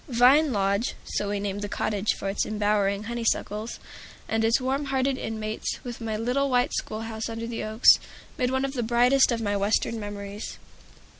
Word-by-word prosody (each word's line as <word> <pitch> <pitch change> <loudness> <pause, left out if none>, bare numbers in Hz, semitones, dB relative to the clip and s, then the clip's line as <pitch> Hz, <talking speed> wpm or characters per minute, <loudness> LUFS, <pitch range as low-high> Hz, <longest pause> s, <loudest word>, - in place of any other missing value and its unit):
"Vine 260 +5 +5
Lodge" 200 +2 0
(so 205 - -2
we 205 0 -1
named 200 0 -3
the 205 - -4
cottage 210 0 0
for - - -5
its 195 +1 0
embowering 205 -1 0
honey 235 +1 -4
suckles), 220 0 -1 0.5
and 225 0 0
its 225 +3 +3
warm 265 +3 -1
hearted 270 0 +1
inmates, 220 -3 -4
with 240 -1 -7
my 220 -1 -2
little 250 +5 0
white 250 +1 +2
schoolhouse 220 +1 -4
under 230 0 -4
the 230 0 -4
oaks, 220 +2 +6 0.4
make 250 -1 0
one 265 +1 +1
of 275 - -4
the 250 - -1
brightest 245 +4 +4
of 230 -1 -1
my 205 -2 0
Western 205 +3 +1
memories. 205 0 -6
225 Hz, 180 wpm, -26 LUFS, 205-250 Hz, 0.5 s, oaks